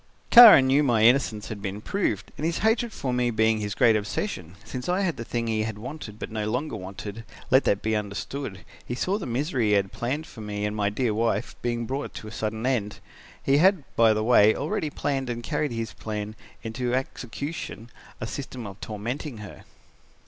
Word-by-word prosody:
"Kara 230 - +11
knew 135 +2 +4
my 120 -6 +3
innocence 115 -3 +3
had 105 -2 -6
been 100 0 -4
proved 195 - -2
and - - -7
his 165 +1 0
hatred 230 +1 +2
for 130 -11 -3
me 125 0 +1
being 110 -1 +2
his 105 -1 -3
great 115 -2 +5
obsession, 100 - -3
since 125 +5 -5
I 180 +2 +1
had 175 -5 0
the - - -6
thing 120 0 -2
he 110 -1 0
had 110 -1 -3
wanted 120 -2 -8
but - - -6
no 110 -1 -2
longer 125 +3 -2
wanted, 100 +3 -7 0.3
let 130 +2 +5
that 100 - +1
be 110 0 +1
understood 105 +1 -5 0.2
he 120 - -4
saw 190 +10 -1
the 185 - -5
misery 125 -1 0
he - - +2
had 100 -1 +2
planned 140 +6 -3
for 115 - -11
me 105 -1 -3
and 105 0 -2
my 100 -1 +1
dear 110 +1 0
wife 115 +1 -1
being 120 -1 -1
brought 135 +5 -4
to 110 - -7
a - - -8
sudden 110 +1 -3
end. 110 -6 0 0.5
He 140 +1 +3
had, 185 0 +4
by 115 -1 +5
the 110 0 -1
way, 110 -2 +5
already 150 +1 -2
planned 135 -3 -2
and 120 -1 -4
carried 150 -1 -1
his 115 -5 -4
plan 105 +2 -5 0.3
into 120 +2 -2
execution, 130 -1 -5 0.3
a 125 - -3
system 125 0 -6
of 100 -1 -9
tormenting 120 +5 -5
her. 105 -2 -10
115 Hz, 205 wpm, -26 LUFS, 105-135 Hz, 0.5 s, Kara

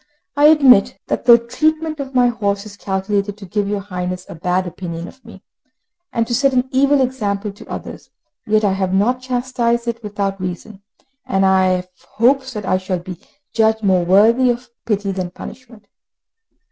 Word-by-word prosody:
I 290 +1 +4
admit 275 -11 +6
that - - -2
the 235 -1 +9
treatment 310 +6 -1
of 270 -1 -6
my 250 -1 +5
horse 200 -3 -2
is 205 -1 -11
calculated 200 +1 -2
to 205 - -10
give 205 +2 -2
your 205 0 -2
Highness 180 -2 -5
a - - -8
bad 180 +3 -1
opinion 170 -1 -6
of 265 - -15
me, 225 - -14 0.7
and 230 - 0
to 240 - -4
set 275 +3 +2
an 255 0 +1
evil 275 +1 +3
example 210 -5 -2
to 200 - -15
others; - - -8 0.4
yet 215 0 +2
I 195 - +2
have 190 -1 -1
not 245 +6 +1
chastised 245 -2 -1
it 235 0 -3
without 200 -2 -3
reason, 185 +3 -6 0.4
and 195 0 +1
I 190 0 +4
have 180 0 -1 0.2
hopes 260 +3 +2
that 210 -3 -5
I 185 - +1
shall 185 0 -2
be 175 0 -9 0.3
judged 220 0 +2
more 185 -3 +3
worthy 220 +8 +4
of 240 +1 -3
pity 205 -2 -1
than 185 -2 -3
punishment." 225 +3 -12
210 Hz, 180 wpm, -18 LUFS, 190-250 Hz, 0.7 s, the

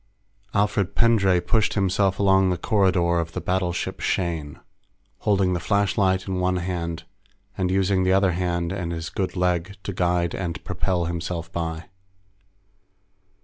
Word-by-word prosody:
_ - - +4
Alfred 100 -2 0
Pendray 100 -6 +4
pushed 110 +4 +1
himself 95 -1 +1
along 95 -1 +4
the 90 - 0
corridor 90 -3 +2
of 85 0 -4
the - - -3
battleship 90 -1 -2
Shane, 80 -5 -2 0.6
holding 95 -3 +2
the 90 - -1
flashlight 95 -1 +1
in 95 -1 -2
one 90 0 +1
hand 85 -2 -3 0.5
and 95 -1 -1
using 95 0 +2
the 95 - +2
other 95 -1 +3
hand 85 -1 -1
and 90 -3 -3
his 80 -1 -5
good 95 -2 -2
leg 90 +1 0
to 100 - -4
guide 90 -1 0
and 85 -3 -4
propel 90 -1 -1
himself 85 0 -4
by. 80 -1 -4
90 Hz, 145 wpm, -24 LUFS, 85-95 Hz, 0.6 s, _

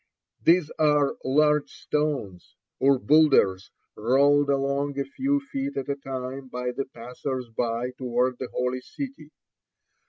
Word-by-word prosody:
These 170 -2 +4
are 150 -2 +3
large 150 +2 +3
stones, 145 -12 -3 0.2
or 135 0 +4
boulders, 135 -10 +4 0.3
rolled 140 +5 +3
along 140 0 0
a 140 - -1
few 275 - 0
feet 275 0 -5
at 135 +1 -3
a 140 - 0
time 135 -1 -6
by 125 0 -3
the 135 +2 -3
passers 125 +1 -6
by 115 +2 -2
toward 125 0 -1
the 130 - -5
Holy 125 0 -1
City. 275 - -8
135 Hz, 130 wpm, -26 LUFS, 125-150 Hz, 0.3 s, These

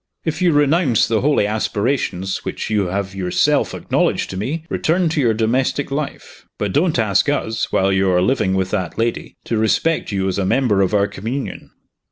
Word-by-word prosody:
"If 160 +1 -2
you 180 -2 +4
renounce 145 - +3
the 110 -2 +1
holy 145 -6 +2
aspirations 105 -2 -1
which - - -4
you 105 -3 +1
have 95 +1 -3
yourself 90 -2 +1
acknowledged - - 0
to - - -6
me, 150 - -3
return 170 +1 +1
to 155 -2 0
your 115 -4 +2
domestic 125 +5 0
life. 145 0 -5
But 100 -2 -2
don't 160 -1 +2
ask 110 +3 +2
us, 115 -6 -1
while 95 0 +2
you 95 0 +2
are 90 -1 +3
living 95 -4 +1
with 95 -1 -1
that 90 - -2
lady, 115 +1 -2
to 115 - -1
respect 155 +9 +1
you 95 -1 -1
as 95 +1 -1
a - - +1
member 105 0 +2
of 95 +2 +1
our 100 -1 +3
communion." 115 +8 -5
110 Hz, 190 wpm, -19 LUFS, 95-140 Hz, -, you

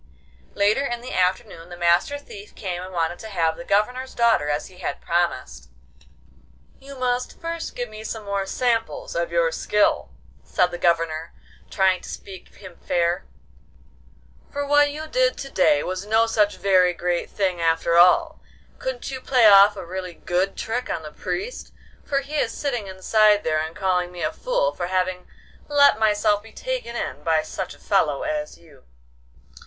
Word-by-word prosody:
Later 210 +7 +2
in 240 -3 -3
the 250 - -7
afternoon 180 -2 -1
the 175 - -9
Master 175 +11 +2
Thief 210 -8 -12
came 180 -3 -4
and 185 +1 -8
wanted 170 -1 -1
to 220 - -8
have 165 -5 0
the 255 - -9
Governor's 250 +4 0
daughter 230 -11 +3
as 145 +1 -1
he 185 -1 -15
had - - -4
promised. 170 - -2 1.1
'You 275 0 -11
must 250 0 -2
first 335 0 -5
give 245 -3 -5
some 220 -2 -6
more 200 -1 -2
samples 230 +1 -1
of 170 0 -1
your 170 -1 +2
skill,' 210 +5 +1 0.3
said 180 -1 +1
the 175 - -6
Governor, 165 -2 0 0.3
trying 190 -1 +2
to - - -10
speak 190 -2 -9
him 185 -3 -13
fair, 175 +1 -1 1.2
'for 285 -1 -3
what 290 0 +4
you 305 +2 -6
did - - +1
to 275 - -7
day 295 +1 +3
was 185 +1 -4
no 220 +1 +4
such 210 -3 +1
very 185 -2 +3
great 175 0 -2
thing 185 -4 -1
after 165 0 +1
all. 315 - +5 0.4
Couldn't - - -4
you 260 -1 -6
play 255 -3 +3
off 205 0 +8
a 190 - -6
really 180 0 -6
good 185 +4 -1
trick 245 +3 -3
on 160 - -3
the 150 - -8
Priest? 425 - -5 0.3
for 275 -1 0
he 290 +2 -5
is 230 - 0
sitting 245 -8 -3
inside 205 +2 +3
there 155 -1 +1
and 160 +1 -4
calling 185 -3 0
me 175 -2 -6
a 155 - -1
fool - - 0
for 175 - -4
having 185 0 -1 0.4
let 285 -5 +5
myself 210 -1 +2
be 225 +1 -15
taken - - -4
in 145 - -4
by 160 0 +1
such 180 +3 -6
a - - -22
fellow 155 -8 +1
as 300 -1 -3
you. 155 -6 -20
200 Hz, 175 wpm, -23 LUFS, 175-250 Hz, 1.2 s, off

